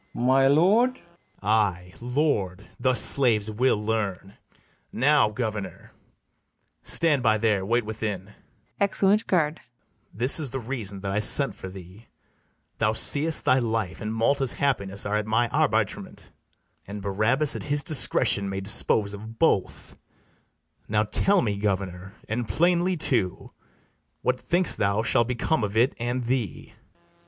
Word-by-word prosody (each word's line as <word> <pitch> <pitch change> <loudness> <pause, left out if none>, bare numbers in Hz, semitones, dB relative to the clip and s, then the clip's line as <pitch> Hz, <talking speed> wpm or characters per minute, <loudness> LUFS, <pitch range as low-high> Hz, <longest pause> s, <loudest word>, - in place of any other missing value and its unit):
My 130 +2 +2
lord? 195 - +3
BARABAS. 170 - -27
Ay, 95 -4 0
LORD; 120 - -2
thus 130 0 +1
slaves 110 -6 +3
will 125 +2 +1
learn. 105 -3 -4 0.6
Now, 145 -2 +2
governor, 105 -2 -6 0.9
stand 155 -5 +2
by 110 -2 +2
there, 105 -3 0
wait 120 +3 0
within, 105 -2 -5 0.5
[Exeunt 200 +1 +1
GUARD.] 160 -3 0 0.5
This 125 +9 +3
is 145 -4 -1
the 135 - -5
reason 110 -6 -6
that 100 0 -4
I 100 - -1
sent 135 +6 +3
for 95 - -9
thee: 95 +4 -13 0.7
Thou 110 - +1
seest 150 +7 +1
thy 130 - +3
life 110 -6 -3
and 105 - -4
Malta's 130 +4 0
happiness 100 -8 -2
Are 105 +1 -1
at 105 0 -4
my 115 +2 +1
arbitrement; - - -2 0.6
and 100 0 -8
Barabas 110 +9 +1
At - - -5
his 145 0 -1
discretion 115 - +4
may 95 0 -4
dispose 100 +1 +2
of 110 +3 -10
both: 130 - -1 0.9
Now 105 0 +1
tell 195 - +2
me, 105 -3 -2
governor, 95 -1 -4
and 115 +1 -3
plainly 175 - +1
too, 115 - 0 0.7
What 125 0 0
think'st 175 0 0
thou 100 +2 0
shall 115 0 +2
become 125 +3 -1
of 105 +1 -3
it 120 +4 +3
and 120 +2 -3
thee? 120 -3 -3
FERNEZE. - - -25
115 Hz, 140 wpm, -24 LUFS, 100-135 Hz, 0.9 s, discretion